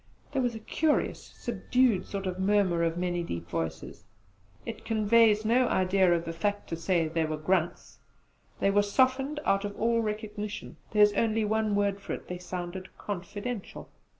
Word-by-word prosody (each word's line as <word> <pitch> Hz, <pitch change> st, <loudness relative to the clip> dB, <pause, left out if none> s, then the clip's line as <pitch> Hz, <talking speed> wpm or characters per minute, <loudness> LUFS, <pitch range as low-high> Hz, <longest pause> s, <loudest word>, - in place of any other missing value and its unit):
There 275 Hz, -2 st, 0 dB
was 245 Hz, -2 st, 0 dB
a -, -, -5 dB
curious 300 Hz, +7 st, 0 dB
subdued 250 Hz, -6 st, 0 dB
sort 195 Hz, -1 st, -4 dB
of 185 Hz, 0 st, -3 dB
murmur 190 Hz, -3 st, +2 dB
of 165 Hz, 0 st, 0 dB
many 175 Hz, -1 st, -1 dB
deep 85 Hz, -, -5 dB
voices. 80 Hz, -1 st, -4 dB, 0.6 s
It 225 Hz, -, -6 dB
conveys 220 Hz, 0 st, +4 dB
no 245 Hz, +3 st, +4 dB
idea 185 Hz, -2 st, +3 dB
of 170 Hz, -1 st, +1 dB
the 165 Hz, -, -4 dB
fact 205 Hz, +5 st, -2 dB
to 165 Hz, -, -2 dB
say 165 Hz, 0 st, +1 dB
they 165 Hz, +1 st, 0 dB
were 155 Hz, 0 st, -2 dB
grunts. 175 Hz, +2 st, -1 dB, 0.6 s
They 195 Hz, -, +3 dB
were 205 Hz, +1 st, +4 dB
softened 260 Hz, +7 st, +1 dB
out 195 Hz, 0 st, +2 dB
of 205 Hz, 0 st, -5 dB
all 230 Hz, +1 st, +2 dB
recognition: 210 Hz, -1 st, -5 dB
there 210 Hz, -1 st, +5 dB
is 210 Hz, 0 st, +5 dB
only 220 Hz, +1 st, +1 dB
one 215 Hz, 0 st, +1 dB
word 200 Hz, -1 st, +1 dB
for -, -, -5 dB
it, -, -, -7 dB
they 180 Hz, 0 st, -4 dB
sounded 180 Hz, +1 st, -6 dB
'confidential.' 205 Hz, +3 st, -6 dB
200 Hz, 175 wpm, -29 LUFS, 175-220 Hz, 0.6 s, there